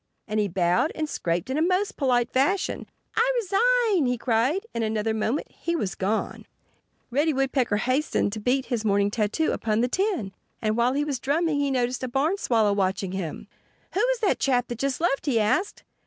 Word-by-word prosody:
And 215 0 -1
he 210 - +2
bowed 180 - +1
and 310 -1 -2
scraped 175 - -2
in 280 - 0
a - - +1
most 370 +4 +1
polite 245 -3 +1
fashion. 345 +9 0 0.3
"I 480 +3 +3
resign!" 455 - +2
he 250 0 0
cried. 250 - +1
In 230 - -2
another 220 0 0
moment 220 +6 -2
he 340 - -3
was 205 - -2
gone. 205 +3 -2 0.6
Reddy 295 +5 +2
Woodpecker 260 -5 +1
hastened 255 -3 0
to 220 - -4
beat 255 +5 +1
his 235 -4 -2
morning 200 -1 +2
tattoo 220 +9 0
upon 220 0 0
the 245 - +2
tin. 370 - -1 0.3
And 215 -1 0
while 240 +2 +2
he 290 +2 0
was 280 -4 -2
drumming 300 +3 0
he 285 -1 +1
noticed 250 -1 0
a 255 - -2
Barn 295 +10 0
Swallow 220 - +2
watching 190 -1 -1
him. 185 -5 -5 0.5
"Who 380 - 0
was - - +1
that 415 - +2
chap 250 -2 +1
that 240 -1 -5
just 275 +2 -1
left?" 300 -4 0
he 245 -5 +3
asked. 220 - 0
255 Hz, 195 wpm, -25 LUFS, 215-315 Hz, 0.6 s, I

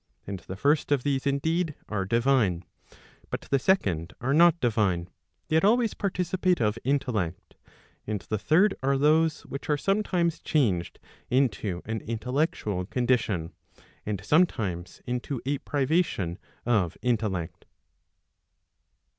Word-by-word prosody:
And 100 -1 -5
the 95 - -8
first 145 +8 +1
of 140 -4 +2
these 140 -1 0
indeed, 160 +3 0
are 100 -3 -2
divine. 115 -5 +2 0.6
But - - -3
the 140 - 0
second 95 - +1
are 130 +4 0
not 170 +2 +6
divine, 100 -7 0 0.4
yet 160 +2 +2
always 225 +2 +3
participate 185 -2 0
of 105 0 0
intellect. 115 -10 -1 0.5
And 105 -1 -1
the 110 +4 -3
third 180 - +4
are 135 +1 +2
those, 155 +2 +3
which 140 - -8
are 150 - +3
sometimes 180 -3 0
changed 100 - 0 0.3
into 115 -8 0
an 110 0 -3
intellectual 115 - -2
condition, 115 -9 0 0.5
and 105 -2 -4
sometimes 100 - +1
into 125 +2 -3
a 140 0 0
privation 135 - 0 0.3
of 100 -8 +1
intellect. 95 -9 -1
125 Hz, 120 wpm, -27 LUFS, 100-155 Hz, 0.6 s, not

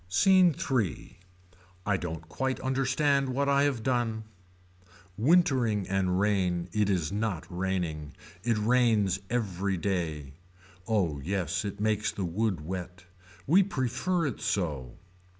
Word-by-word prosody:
SCENE 185 - +5 0.2
III. 105 - -1 0.7
I 105 - +2
don't 80 -3 -5
quite 130 +9 -2
understand 135 +1 +1
what 140 +2 0
I 140 0 +3
have 130 -6 -1
done. 120 -3 0 0.9
Wintering 125 - +3
and 95 -1 +1
rain 90 -4 +1
it 105 -1 +2
is 85 -6 0
not 105 -5 -2
raining. 90 -5 -2 0.3
It 115 -1 +1
rains 110 -4 +2
every 100 -5 -1
day. 80 -7 -2 0.5
Oh 90 -10 0
yes 90 0 -1
it 100 -1 -5
makes 105 0 +1
the 95 - -3
wood 95 0 -1
wet. 90 0 -6 0.4
We 175 +8 +5
prefer 170 - -1
it 135 -7 -3
so. 75 - -2
105 Hz, 125 wpm, -29 LUFS, 90-125 Hz, 0.9 s, SCENE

